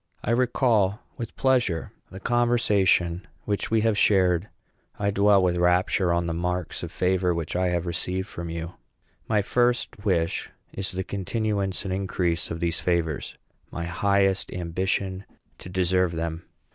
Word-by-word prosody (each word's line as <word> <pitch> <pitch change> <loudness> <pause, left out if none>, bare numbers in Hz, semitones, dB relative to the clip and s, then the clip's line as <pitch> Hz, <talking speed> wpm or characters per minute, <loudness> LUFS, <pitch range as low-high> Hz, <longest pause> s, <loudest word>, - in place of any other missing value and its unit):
I - - 0
recall 115 -4 +2 0.2
with 115 -2 -6
pleasure 125 -11 +1 0.2
the 95 - -9
conversation 100 -7 +2 0.2
which 100 -1 -1
we 110 -1 +3
have 110 -1 +2
shared. 95 -2 +3 0.5
I 100 0 0
dwell 100 -1 +4
with 90 -1 +2
rapture 90 +1 +2
on 85 0 +1
the 85 - -2
marks 90 0 -2
of - - -6
favor 90 -1 +1
which 85 0 -3
I 90 +1 +2
have 90 -1 0
received 90 +2 -2
from 85 -3 -6
you. 85 +1 -5 0.5
My 105 -2 +2
first 120 -2 0
wish 85 -6 0 0.2
is 95 0 -3
the 95 +1 -2
continuance 100 0 -2
and 95 - -2
increase 90 -3 -1
of 80 - -4
these 85 -1 0
favors; 85 -4 -1 0.3
my 85 - -4
highest 95 +2 +1
ambition, 95 +2 -2 0.4
to - - -9
deserve 90 -1 +1
them. 85 0 -4
95 Hz, 150 wpm, -25 LUFS, 85-100 Hz, 0.5 s, dwell